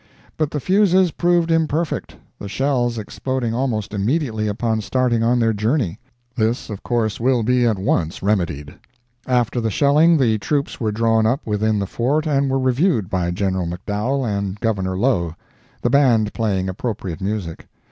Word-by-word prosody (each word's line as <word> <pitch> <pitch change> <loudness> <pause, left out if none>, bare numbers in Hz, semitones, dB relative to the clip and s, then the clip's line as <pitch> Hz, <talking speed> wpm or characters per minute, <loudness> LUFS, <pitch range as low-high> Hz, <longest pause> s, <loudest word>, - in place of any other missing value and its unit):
But 155 -2 0
the 150 - -3
fuses 190 +1 +3
proved 175 0 +1
imperfect, 160 0 -1 0.2
the 100 - -6
shells 125 -1 0
exploding 120 +2 -3
almost 115 -5 -2
immediately 110 +1 -1
upon 110 +1 -1
starting 120 +1 0
on 120 +2 +2
their 115 -2 +2
journey. 110 - -1 0.4
This 115 0 -1
of 100 - -6
course 115 -4 -1
will 125 -1 +2
be 125 +1 +2
at 110 -3 +1
once 90 -4 -1
remedied. 85 -8 -1 0.5
After 125 -1 +1
the 115 - 0
shelling, 150 - +4
the 115 -6 +2
troops 145 +5 -2
were 110 -3 0
drawn 110 0 +2
up 130 +7 -1
within 110 0 0
the 100 - -1
Fort 135 - 0
and 140 -2 +1
were 135 - +1
reviewed 130 - +1
by 90 -2 0
General 95 0 -1
McDowell 105 +9 -2
and 100 -1 -3
Governor 95 -5 -1
Low; 90 -8 0 0.5
the 120 - +1
Band 120 -6 +3
playing 100 -5 -1
appropriate 95 -2 -4
music. 95 -4 -4
115 Hz, 160 wpm, -20 LUFS, 100-135 Hz, 0.5 s, shelling